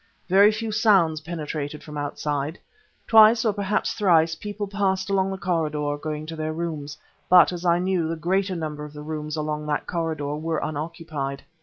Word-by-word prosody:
Very 200 +3 +6
few 220 +1 -3
sounds 195 -8 +3
penetrated 150 -2 -5
from 150 - -9
outside. 145 +1 -3 0.5
Twice 220 +1 +7
or 215 - +2
perhaps 205 +1 -1
thrice 170 -6 +3
people 205 +5 -5
passed 195 -1 -1
along 195 -1 +2
the 190 - -4
corridor, 155 -5 -1
going 150 +1 -5
to 165 +1 -6
their 155 0 -3
rooms; 155 -3 -4 0.3
but, 180 -2 +7
as 175 0 -6
I 170 0 +4
knew, 180 -2 0
the 165 - -2
greater 185 +4 0
number 155 -3 -4
of 150 0 -9
the 150 0 -8
rooms 155 0 -4
along 150 -1 -3
that 150 -1 -1
corridor 160 -4 -2
were 160 +1 -2
unoccupied. 155 -3 -4
160 Hz, 175 wpm, -24 LUFS, 150-190 Hz, 0.5 s, Twice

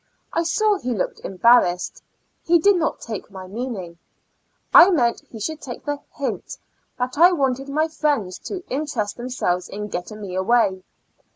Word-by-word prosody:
I 335 - +2
saw 415 +5 +2
he 250 -6 -2
looked 190 - -2
embarrassed; 190 -3 +2 0.4
he 340 +1 +4
did 400 +5 +4
not 325 -3 -1
take 220 -4 -6
my 190 -2 -9
meaning. 190 -5 -6 0.7
I 360 - +10
meant 245 -10 +2
he 225 - -9
should 310 +8 -4
take 245 -3 -8
the 290 -1 -2 0.2
hint, 280 - -4 0.4
that 255 +3 -3
I 350 +2 +8
wanted 270 -3 0
my 310 +3 +1
friends 290 - -1
to 375 -3 -5
interest 260 -7 -2
themselves 240 -8 -2
in 210 +1 -5
getting 185 +4 -5
me 195 -3 -6
away. 190 0 +2
245 Hz, 160 wpm, -22 LUFS, 200-305 Hz, 0.7 s, I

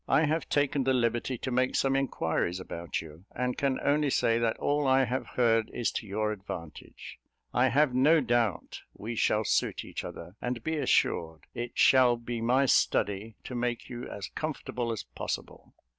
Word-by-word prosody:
I 155 - +4
have 155 +2 -1
taken 145 -1 +1
the 130 0 +2
liberty 120 +1 0
to 130 - -4
make 130 +1 +1
some 135 0 +2
inquiries 90 -9 -1
about 85 -2 -4
you; 80 +3 -13
and 125 0 -1
can 135 -2 0
only 145 0 +2
say, 115 -3 +2
that 115 -1 0
all 145 0 0
I 135 0 +5
have 125 +3 -3
heard 115 -2 +2
is 120 - 0
to 110 - -5
your 105 +2 -1
advantage. 90 -6 -8 0.3
I 125 +2 +4
have 135 +1 +3
no 150 +6 +5
doubt 120 - 0
we 115 +3 -5
shall 110 -1 +2
suit - - 0
each - - -6
other; 90 - -9
and 125 -2 -3
be 160 0 -1
assured 80 - +1
it 120 0 -5
shall 125 -2 +5
be 115 0 -5
my 125 +4 +3
study 105 -3 +1
to - - -7
make 120 -1 -2
you 120 0 -6
as 100 -2 -6
comfortable 125 -6 -3
as 110 - -4
possible." - - -6
120 Hz, 180 wpm, -29 LUFS, 110-135 Hz, 0.3 s, I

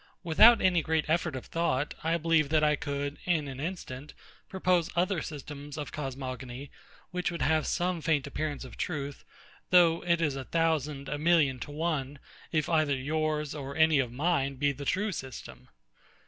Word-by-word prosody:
Without 220 +8 +7
any 180 -3 +3
great 160 0 0
effort 165 -2 0
of 130 - -6
thought, 150 -4 -1
I 165 +1 +2
believe 165 -3 +2
that 155 0 +3
I 150 0 +4
could, 140 0 -4
in 160 -5 +1
an 135 -1 -7
instant, 150 -4 -6 0.3
propose 180 -3 +1
other 180 0 +1
systems 145 -1 -7
of 150 - -5
cosmogony, 130 -1 -6 0.4
which 180 -1 -1
would 170 -1 -3
have 160 -1 +2
some 175 -1 0
faint 150 -4 +1
appearance 150 -3 -4
of 130 - -11
truth, 145 -4 -4 0.5
though 170 -2 +5
it 170 -1 +2
is 150 -5 0
a 135 -1 -5
thousand, 150 -4 0
a 145 - -3
million 150 -5 +3
to - - -7
one, 145 -2 -2 0.3
if 155 -3 +1
either 155 -4 +2
yours 150 +2 -1
or 140 -2 -6
any 160 -2 +4
one 135 - +3
of - - -14
mine 140 0 0
be 145 +2 +1
the 140 +1 -7
true 205 +8 0
system. 130 - -8
150 Hz, 175 wpm, -29 LUFS, 140-165 Hz, 0.5 s, Without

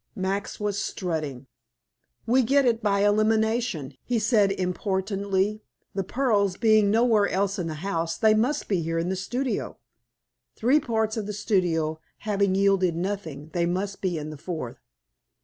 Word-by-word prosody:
Max 195 0 -3
was 205 -1 -1
strutting. 155 -8 -3 0.8
"We 250 +4 +4
get 275 +3 +3
it 230 -2 +2
by 200 -1 +2
elimination," 215 - +1
he 245 - 0
said 215 -2 +3
importantly. 195 +2 -1 0.3
"The 195 - -1
pearls 205 -5 +1
being 215 -3 +4
nowhere 220 -1 +3
else 195 +1 0
in 175 - -2
the 160 - -4
house, 165 -3 -1
they 215 +3 +4
must 250 +7 0
be 190 -4 +1
here 165 +1 -2
in 170 +2 -1
the 190 - 0
studio. 245 +7 -3 0.8
Three 255 +7 +3
parts 220 -4 -1
of 210 -2 -3
the 210 - -3
studio 165 -6 0 0.2
having 200 -2 0
yielded 195 -3 +3
nothing, 165 -5 -4
they 170 -1 +1
must 195 +3 -2
be 180 -3 -1
in 155 0 -5
the 150 - -9
fourth. 155 -7 -5
200 Hz, 155 wpm, -26 LUFS, 175-220 Hz, 0.8 s, We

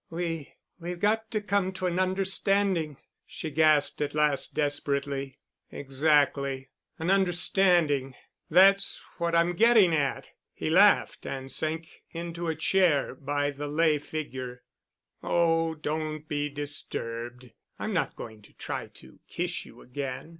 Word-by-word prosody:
"We—we've 170 +1 -6
got 220 +3 +1
to 220 - -1
come 200 -2 0
to 185 0 -4
an 180 0 0
understanding——" 190 -4 0 0.3
she 160 - -7
gasped 155 -1 +3
at 145 0 -2
last 150 -2 +1
desperately. 140 -2 -1 0.3
"Exactly—an 140 +2 0
understanding. 175 -7 +2 0.3
That's 195 +4 +4 0.2
what 170 0 0
I'm 170 +1 +3
getting 215 -3 +5
at——" 140 -3 -1 0.2
he 155 - -3
laughed 200 +5 +4
and 135 0 -5
sank 160 +1 -3
into 170 0 -5
a 160 - -1
chair 160 -3 +2
by 145 +1 -2
the 145 +1 -6
lay 155 0 +2
figure. 130 -5 -6 0.6
"Oh, 165 -1 +1
don't 155 0 -4
be 145 0 -2
disturbed. 125 -4 -4 0.3
I'm - - -3
not - - -1
going 110 -2 -9
to 105 - -19
try - - -5
to 65 - -17
kiss - - -3
you - - -15
again. 130 +2 -6
155 Hz, 125 wpm, -28 LUFS, 140-175 Hz, 0.6 s, getting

